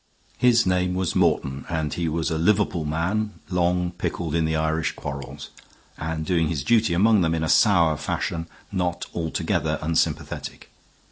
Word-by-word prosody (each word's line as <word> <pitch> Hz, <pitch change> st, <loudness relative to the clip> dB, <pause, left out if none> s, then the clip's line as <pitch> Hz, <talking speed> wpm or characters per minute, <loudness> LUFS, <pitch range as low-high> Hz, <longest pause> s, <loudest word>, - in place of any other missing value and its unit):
His 120 Hz, -2 st, +4 dB
name 90 Hz, 0 st, +1 dB
was 95 Hz, -2 st, -1 dB
Morton, 70 Hz, +1 st, +1 dB
and 80 Hz, -3 st, -2 dB
he 85 Hz, -2 st, -1 dB
was 80 Hz, +1 st, -1 dB
a 80 Hz, -, 0 dB
Liverpool 95 Hz, -3 st, +2 dB
man 95 Hz, +8 st, -1 dB, 0.2 s
long 90 Hz, 0 st, +1 dB
pickled 85 Hz, -2 st, -3 dB
in 80 Hz, -1 st, +2 dB
the 80 Hz, 0 st, 0 dB
Irish 80 Hz, +1 st, 0 dB
quarrels, 70 Hz, -1 st, -7 dB, 0.4 s
and 80 Hz, 0 st, -4 dB
doing 85 Hz, -1 st, +1 dB
his 75 Hz, -4 st, -2 dB
duty 110 Hz, -, +3 dB
among 105 Hz, +2 st, +4 dB
them 80 Hz, -1 st, +1 dB
in 80 Hz, -, -1 dB
a -, -, 0 dB
sour 85 Hz, -6 st, +4 dB
fashion 85 Hz, +3 st, -3 dB, 0.2 s
not 90 Hz, -3 st, -1 dB
altogether 80 Hz, -1 st, -1 dB
unsympathetic. 80 Hz, +1 st, -2 dB
85 Hz, 155 wpm, -24 LUFS, 80-90 Hz, 0.4 s, His